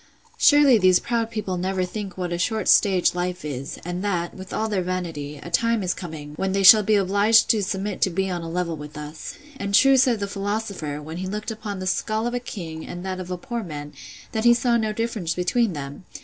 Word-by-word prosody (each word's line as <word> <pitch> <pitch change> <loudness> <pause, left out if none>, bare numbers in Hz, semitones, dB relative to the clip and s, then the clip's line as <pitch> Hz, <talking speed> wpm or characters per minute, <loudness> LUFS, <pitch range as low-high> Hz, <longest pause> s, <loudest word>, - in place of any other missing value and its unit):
—Surely 285 -5 +6
these 185 -1 +5
proud 230 +1 -1
people 210 -5 -3
never 185 +1 -1
think 195 0 -6
what 180 -2 -3
a - - -1
short 220 +5 -1
stage 190 -4 +4
life 180 -1 -3
is; 140 -2 -5
and 175 +2 -4
that, 175 -4 -1
with 190 0 -10
all 220 - -1
their 205 -3 -1
vanity; 165 -5 -4
a 170 +4 -10
time 230 +3 +1
is 180 -1 0
coming, 155 -5 -8
when 190 0 -1
they 195 0 +1
shall 215 +3 +10
be 215 +1 +2
obliged 205 +3 +4
to 220 - +1
submit 195 0 -3
to - - +3
be 190 +2 -1
on 180 -2 -3
a 165 - -6
level 170 -1 -2
with 150 0 -10
us: 150 +1 -8 0.2
And 200 -4 -1
true 270 +3 +6
said 250 -4 +3
the 200 - -1
philosopher, 200 -7 -3
when 160 +2 -7
he 185 +1 -4
looked 210 +3 -4
upon 210 -2 -6
the 185 - -5
skull 215 +4 -1
of 240 - -2
a 245 - -1
king, 165 -9 -7
and 175 +1 -7
that 185 -1 -3
of 185 -1 -7
a 180 - -3
poor 235 +5 -4
man, 150 -6 -7 0.4
that 220 - -2
he 240 0 +6
saw 240 0 +1
no 220 -2 0
difference 215 -6 -2
between 190 +4 +1
them. 145 +2 -7
190 Hz, 235 wpm, -23 LUFS, 175-215 Hz, 0.4 s, shall